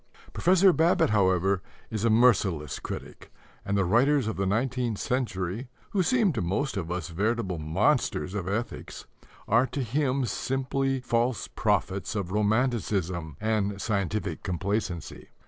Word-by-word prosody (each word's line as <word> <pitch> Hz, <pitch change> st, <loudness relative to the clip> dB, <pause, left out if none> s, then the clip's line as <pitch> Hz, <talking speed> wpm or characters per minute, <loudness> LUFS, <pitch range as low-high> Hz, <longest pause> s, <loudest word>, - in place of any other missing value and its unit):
Professor 185 Hz, +1 st, +5 dB
Babbitt, 165 Hz, -8 st, +3 dB
however, 95 Hz, -2 st, +2 dB, 0.3 s
is 110 Hz, -2 st, -2 dB
a 115 Hz, -, +3 dB
merciless 105 Hz, -, +3 dB
critic, -, -, -8 dB, 0.3 s
and 100 Hz, 0 st, -1 dB
the 100 Hz, -, +2 dB
writers 130 Hz, +8 st, +3 dB
of 110 Hz, -, -2 dB
the 95 Hz, 0 st, -1 dB
nineteenth 120 Hz, +1 st, 0 dB
century, 110 Hz, -2 st, -2 dB, 0.2 s
who 195 Hz, -, +2 dB
seemed 205 Hz, 0 st, +2 dB
to 115 Hz, -, -2 dB
most 105 Hz, -, -1 dB
of 90 Hz, -4 st, -3 dB
us 90 Hz, 0 st, -3 dB
veritable 100 Hz, 0 st, -1 dB
monsters 75 Hz, +1 st, +1 dB
of 100 Hz, -4 st, -3 dB
ethics, 110 Hz, +5 st, -4 dB, 0.4 s
are 120 Hz, +5 st, +4 dB
to 130 Hz, +2 st, -3 dB
him 135 Hz, +2 st, 0 dB
simply 135 Hz, +2 st, -1 dB
false 120 Hz, -1 st, 0 dB
prophets 95 Hz, +3 st, -1 dB
of 95 Hz, -3 st, -3 dB
romanticism 105 Hz, -, 0 dB
and 105 Hz, -2 st, 0 dB
scientific 100 Hz, -3 st, -2 dB
complacency. 95 Hz, -1 st, -3 dB
110 Hz, 135 wpm, -27 LUFS, 95-125 Hz, 0.4 s, Professor